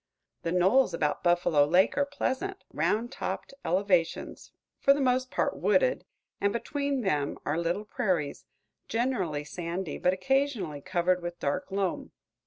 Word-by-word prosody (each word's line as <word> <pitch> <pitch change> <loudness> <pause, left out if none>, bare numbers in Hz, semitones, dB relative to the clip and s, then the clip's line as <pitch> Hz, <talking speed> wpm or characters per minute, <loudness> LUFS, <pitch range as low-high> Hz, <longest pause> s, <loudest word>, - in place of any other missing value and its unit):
The 165 - -2
knolls 185 +4 +4
about 150 -3 0
Buffalo 175 -4 +3
Lake 180 +6 +3
are 285 0 +1
pleasant, 285 +7 -3
round 235 +4 0
topped - - -4
elevations, 180 -1 0 0.3
for 275 - +6
the - - -2
most 255 -1 +2
part - - 0
wooded, - - +2 0.4
and 200 - +2
between 280 +4 -2
them 150 -9 0
are 145 - 0
little 175 +5 -1
prairies, 185 - -1 0.4
generally 210 - -1
sandy, 170 +3 -4
but 180 - +3
occasionally 200 - 0
covered 180 +1 +1
with 175 0 -5
dark 145 +7 -2
loam. 195 -2 -2
185 Hz, 140 wpm, -29 LUFS, 170-255 Hz, 0.4 s, for